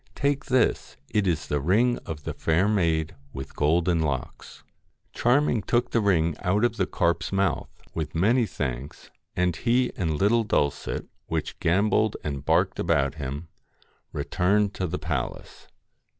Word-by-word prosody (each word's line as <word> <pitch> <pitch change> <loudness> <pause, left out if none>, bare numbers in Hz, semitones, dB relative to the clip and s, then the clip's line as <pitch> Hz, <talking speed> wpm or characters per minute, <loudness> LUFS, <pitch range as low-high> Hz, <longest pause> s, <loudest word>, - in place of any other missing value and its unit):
Take 140 0 0
this, 125 - +1
it 105 -2 +1
is 80 -4 0
the 75 - -1
ring 110 - +2
of 75 -2 -6
the - - -4
fair 85 +5 +1
maid 85 -7 +1 0.2
with 65 0 -7
golden 85 +3 +2
locks.' 70 -5 -4 0.5
Charming 125 -1 +2
took 120 +5 0
the 115 - +2
ring 85 -6 +2
out 100 +6 +2
of 115 -1 -1
the - - +1
carp's 85 -2 0
mouth, 95 0 0 0.2
with 80 -1 -4
many 115 +7 +3
thanks, 70 -4 -5 0.2
and 90 -1 +1
he 125 +6 +1
and 80 -4 -1
little 115 +6 +3
Dulcet, 75 -9 -1 0.2
which - - -3
gambolled 105 +4 +2
and 70 -2 -4
barked - - +2
about 70 -1 +1
him, 70 +4 -5 0.6
returned 100 +2 +1
to 95 - -2
the - - -3
palace. - - -4
90 Hz, 150 wpm, -26 LUFS, 80-110 Hz, 0.6 s, many